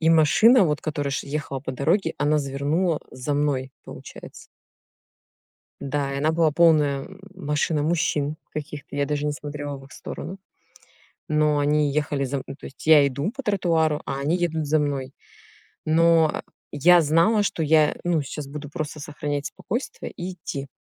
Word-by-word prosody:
и 160 Hz, -, +2 dB
машина, 190 Hz, -, +6 dB
вот 150 Hz, -3 st, 0 dB
которая 145 Hz, -2 st, -2 dB
ш 135 Hz, -, -3 dB
ехала 140 Hz, -2 st, -4 dB
по 130 Hz, -1 st, -5 dB
дороге, 165 Hz, +6 st, +1 dB
она 150 Hz, +1 st, +2 dB
завернула, 145 Hz, +5 st, 0 dB
э, -, -, -29 dB
за 140 Hz, +3 st, -2 dB
мной 135 Hz, -2 st, 0 dB
получается. -, -, -11 dB, 1.4 s
Да, 140 Hz, 0 st, -2 dB
и 140 Hz, -, -3 dB
она 155 Hz, +3 st, +2 dB
была 160 Hz, -1 st, +2 dB
полная, 150 Hz, -4 st, +4 dB
м, 195 Hz, 0 st, -14 dB
машина 150 Hz, -3 st, -1 dB
мужчин 155 Hz, -2 st, 0 dB, 0.2 s
каких-то, 150 Hz, -1 st, -7 dB
я 145 Hz, 0 st, +1 dB
даже 150 Hz, 0 st, -2 dB
не 150 Hz, -, 0 dB
смотрела 145 Hz, -1 st, -6 dB
в 135 Hz, -, -13 dB
их 140 Hz, -, -18 dB
сторону, 190 Hz, +3 st, -7 dB, 0.9 s
но 150 Hz, -1 st, +2 dB
они 145 Hz, 0 st, +2 dB
ехали 145 Hz, -2 st, -1 dB
за 135 Hz, +2 st, -2 dB
мн 130 Hz, -, -6 dB
ну, 135 Hz, -, -6 dB
то -, -, -11 dB
есть 135 Hz, -, -12 dB
я 150 Hz, -3 st, +7 dB
иду 140 Hz, +8 st, -2 dB
по 275 Hz, -, -6 dB
тротуару, 165 Hz, -7 st, +1 dB
а 135 Hz, -, -3 dB
они 150 Hz, +6 st, +1 dB
едут 160 Hz, -3 st, -1 dB
за 155 Hz, +2 st, +3 dB
мной. 140 Hz, -2 st, -2 dB, 0.7 s
Но, 165 Hz, 0 st, +4 dB
а, -, -, -4 dB, 0.3 s
я 175 Hz, +5 st, +6 dB
знала, 165 Hz, +8 st, +3 dB
что 170 Hz, -4 st, -1 dB
я 155 Hz, 0 st, +4 dB
ну, 170 Hz, -4 st, +1 dB
щас 140 Hz, +1 st, -6 dB
буду 145 Hz, 0 st, -7 dB
просто 155 Hz, -1 st, -5 dB
сохранять 145 Hz, 0 st, -4 dB
спокойствие 240 Hz, +6 st, -5 dB
и 180 Hz, +2 st, -5 dB
идти. 140 Hz, -6 st, -6 dB
150 Hz, 175 wpm, -24 LUFS, 145-165 Hz, 1.4 s, я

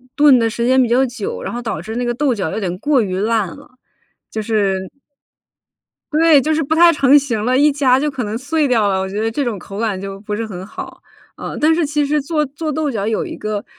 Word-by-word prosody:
炖 290 Hz, -3 st, +6 dB
的 230 Hz, -1 st, +1 dB
时 235 Hz, +1 st, -2 dB
间 260 Hz, +1 st, +4 dB
比 245 Hz, -, +1 dB
较 255 Hz, +3 st, +3 dB
久， 425 Hz, -, -5 dB
然 -, -, -5 dB
后 240 Hz, -, -4 dB
导 230 Hz, -3 st, -4 dB
致 220 Hz, +1 st, -7 dB
那 245 Hz, -, -1 dB
个 240 Hz, -, 0 dB
豆 270 Hz, +1 st, +1 dB
角 195 Hz, -7 st, -2 dB
有 215 Hz, -, -3 dB
点 180 Hz, -4 st, -3 dB
过 290 Hz, 0 st, +2 dB
于 185 Hz, -2 st, -3 dB
烂 220 Hz, -1 st, +1 dB
了。 -, -, -16 dB, 0.6 s
就 220 Hz, -, -4 dB
是 205 Hz, -3 st, 0 dB, 1.4 s
对， 315 Hz, -2 st, +5 dB
就 310 Hz, +4 st, 0 dB
是 315 Hz, -, 0 dB
不 310 Hz, +2 st, 0 dB
太 340 Hz, +1 st, +7 dB
成 280 Hz, -2 st, +5 dB
型 245 Hz, -7 st, -1 dB
了， 255 Hz, +1 st, +2 dB
一 295 Hz, +2 st, +4 dB
夹 270 Hz, -3 st, +3 dB
就 295 Hz, +2 st, -1 dB
可 250 Hz, -4 st, -4 dB
能 210 Hz, +2 st, -3 dB
碎 295 Hz, +4 st, 0 dB
掉 225 Hz, -5 st, +2 dB
了。 190 Hz, -1 st, 0 dB
我 190 Hz, -, -2 dB
觉 200 Hz, +2 st, -4 dB
得 225 Hz, 0 st, -1 dB
这 280 Hz, +5 st, -2 dB
种 235 Hz, -4 st, -2 dB
口 195 Hz, +2 st, -9 dB
感 215 Hz, -4 st, -1 dB
就 195 Hz, 0 st, -7 dB
不 210 Hz, 0 st, -4 dB
是 225 Hz, +2 st, -3 dB
很 190 Hz, -3 st, -7 dB
好， -, -, -9 dB, 0.4 s
呃， -, -, -6 dB
但 310 Hz, +2 st, +4 dB
是 330 Hz, 0 st, +1 dB
其 295 Hz, 0 st, 0 dB
实 295 Hz, +1 st, 0 dB
做 300 Hz, +1 st, -1 dB
做 310 Hz, +4 st, -5 dB
豆 300 Hz, -1 st, -1 dB
角 210 Hz, -4 st, -2 dB
有 220 Hz, -, -1 dB
一 -, -, -7 dB
个， 215 Hz, -1 st, -3 dB
245 Hz, 275 characters per minute, -18 LUFS, 215-290 Hz, 1.4 s, 太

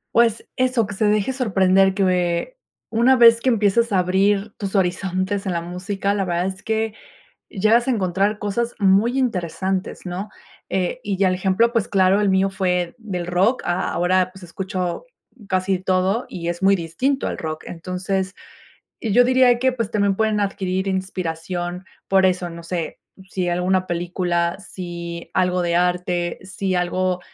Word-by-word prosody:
Pues 230 Hz, -1 st, +3 dB
eso, 255 Hz, -4 st, +1 dB
que 200 Hz, -, -6 dB
se 215 Hz, -, -1 dB
deje 210 Hz, +5 st, +1 dB
sorprender, 195 Hz, -6 st, +3 dB
que 185 Hz, -, 0 dB, 0.3 s
una 240 Hz, +3 st, +4 dB
vez 230 Hz, -1 st, +7 dB
que 260 Hz, -, +2 dB
empiezas 225 Hz, 0 st, +2 dB
a 190 Hz, -, +3 dB
abrir 195 Hz, +3 st, +1 dB
tus 200 Hz, -1 st, -4 dB
horizontes 190 Hz, +2 st, -1 dB
en 190 Hz, -, -1 dB
la 170 Hz, -, 0 dB
música, 190 Hz, +3 st, -3 dB
la 200 Hz, -1 st, 0 dB
verdad 175 Hz, 0 st, -1 dB
es 190 Hz, 0 st, -5 dB
que, 220 Hz, -1 st, -1 dB, 0.6 s
llegas 225 Hz, +4 st, +2 dB
a 260 Hz, -, +2 dB
encontrar 200 Hz, +1 st, 0 dB
cosas 230 Hz, +4 st, -2 dB
muy 200 Hz, +6 st, +3 dB
interesantes, 185 Hz, -5 st, -2 dB
¿no?, 185 Hz, +3 st, -5 dB, 0.4 s
eh, 190 Hz, +6 st, -1 dB
y 200 Hz, -2 st, -1 dB
ya 190 Hz, -1 st, +3 dB
el 185 Hz, -, 0 dB
ejemplo, 195 Hz, +5 st, +2 dB
pues, 230 Hz, -4 st, +1 dB
claro 195 Hz, +1 st, +3 dB
el 205 Hz, -, +2 dB
mío 190 Hz, +1 st, +2 dB
fue 180 Hz, +1 st, -1 dB
del 180 Hz, -6 st, -5 dB
rock, 195 Hz, +8 st, +2 dB
a 175 Hz, +1 st, -1 dB
ahora, 185 Hz, +1 st, +1 dB
pues, 190 Hz, -1 st, -14 dB
escucho 180 Hz, -, -4 dB, 0.4 s
casi 185 Hz, 0 st, +1 dB
todo 185 Hz, +5 st, 0 dB
y 170 Hz, -1 st, -5 dB
es 175 Hz, +1 st, -3 dB
muy 195 Hz, +1 st, +5 dB
distinto 195 Hz, -, -1 dB
al -, -, -5 dB
rock. 155 Hz, -1 st, -5 dB
Entonces, 185 Hz, +2 st, -3 dB, 0.6 s
y 220 Hz, -4 st, -2 dB
yo 245 Hz, +3 st, +6 dB
diría 255 Hz, -1 st, +4 dB
que, 260 Hz, 0 st, +3 dB
pues, 230 Hz, -4 st, -3 dB
también 200 Hz, -2 st, +1 dB
pueden 220 Hz, -1 st, +1 dB
adquirir 190 Hz, -1 st, -1 dB
inspiración 180 Hz, -1 st, -3 dB, 0.2 s
por 190 Hz, -1 st, +4 dB
eso, 180 Hz, -1 st, 0 dB
no 170 Hz, 0 st, -10 dB
sé, 170 Hz, -1 st, -4 dB, 0.3 s
si 180 Hz, -2 st, -1 dB
alguna 185 Hz, +1 st, +1 dB
película, 175 Hz, 0 st, -1 dB
si 170 Hz, -3 st, -7 dB
algo 180 Hz, -1 st, +1 dB
de 170 Hz, 0 st, +1 dB
arte, 180 Hz, 0 st, 0 dB
si 190 Hz, 0 st, -3 dB
algo 180 Hz, +1 st, 0 dB
190 Hz, 165 wpm, -21 LUFS, 180-205 Hz, 0.6 s, vez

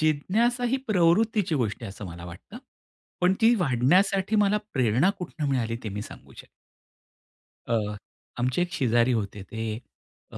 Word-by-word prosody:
जिज्ञासा 210 Hz, -, +1 dB
ही -, -, +4 dB
प्रवृत्तीची 200 Hz, 0 st, +2 dB
गोष्ट 120 Hz, -5 st, -1 dB
आहे 115 Hz, -, -5 dB
असं 100 Hz, +1 st, -9 dB
मला 85 Hz, 0 st, -9 dB
वाटतं. 95 Hz, -, -10 dB, 0.6 s
पण 180 Hz, +1 st, +4 dB
ती 230 Hz, +1 st, +6 dB
वाढण्यासाठी 185 Hz, -, +2 dB
मला 210 Hz, 0 st, +3 dB
प्रेरणा 130 Hz, -, +3 dB
कुठून 155 Hz, -4 st, -4 dB
मिळाली 115 Hz, -4 st, -1 dB
ते -, -, -2 dB
मी 105 Hz, +1 st, -5 dB
सांगू -, -, -12 dB
शकतो. -, -, -12 dB, 1.2 s
अ, 105 Hz, -3 st, -1 dB, 0.4 s
आमचे 125 Hz, +6 st, 0 dB
एक 175 Hz, 0 st, -1 dB
शेजारी 120 Hz, -2 st, +2 dB
होते. 100 Hz, -3 st, -3 dB
ते 110 Hz, 0 st, -4 dB, 0.5 s
अ, -, -, -8 dB
140 Hz, 150 wpm, -26 LUFS, -, 1.2 s, ती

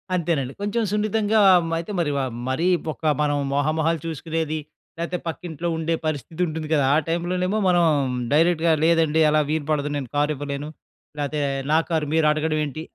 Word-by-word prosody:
అంతేనండి. 155 Hz, -7 st, -1 dB
కొంచెం 205 Hz, +3 st, 0 dB
సున్నితంగా 215 Hz, +1 st, +1 dB, 0.3 s
మ -, -, -5 dB
అయితే 170 Hz, +5 st, -5 dB
మరి 155 Hz, -4 st, +1 dB
ఆహ్, 125 Hz, -, -4 dB, 0.2 s
మరీ 165 Hz, +7 st, 0 dB, 0.2 s
ఒక 155 Hz, -, -13 dB, 0.2 s
మనం 145 Hz, -1 st, +1 dB, 0.2 s
మొహ 145 Hz, +1 st, +1 dB
మొహాలు 160 Hz, 0 st, +1 dB
చూసుకునేది 160 Hz, 0 st, -3 dB, 0.4 s
లేపోతే 170 Hz, +2 st, -2 dB
పక్కింట్లో 165 Hz, +1 st, -5 dB
ఉండే 165 Hz, +1 st, 0 dB
పరిస్థితి 155 Hz, +2 st, -4 dB
ఉంటుంది 155 Hz, -1 st, -4 dB
కదా! 145 Hz, -3 st, +3 dB
ఆ -, -, +4 dB
టైమ్‌లోనేమో 180 Hz, +4 st, -1 dB
మనం 175 Hz, -1 st, +4 dB, 0.5 s
డైరెక్ట్‌గా 165 Hz, +1 st, +3 dB
లేదండి 160 Hz, -1 st, +3 dB
అలా 155 Hz, 0 st, +3 dB
వీలుపడదు 150 Hz, -1 st, -1 dB
నేను 135 Hz, -3 st, -3 dB
కార్ 145 Hz, +1 st, +2 dB
ఇవ్వలేను, 145 Hz, +1 st, -5 dB, 0.5 s
లేపోతే 145 Hz, +1 st, -2 dB, 0.3 s
నా 155 Hz, -, +5 dB
కారు 160 Hz, -3 st, 0 dB
మీరు 160 Hz, -1 st, +3 dB
అడగడం 155 Hz, 0 st, 0 dB
ఏంటి 150 Hz, +2 st, -6 dB
160 Hz, 160 wpm, -23 LUFS, 150-170 Hz, 0.5 s, నా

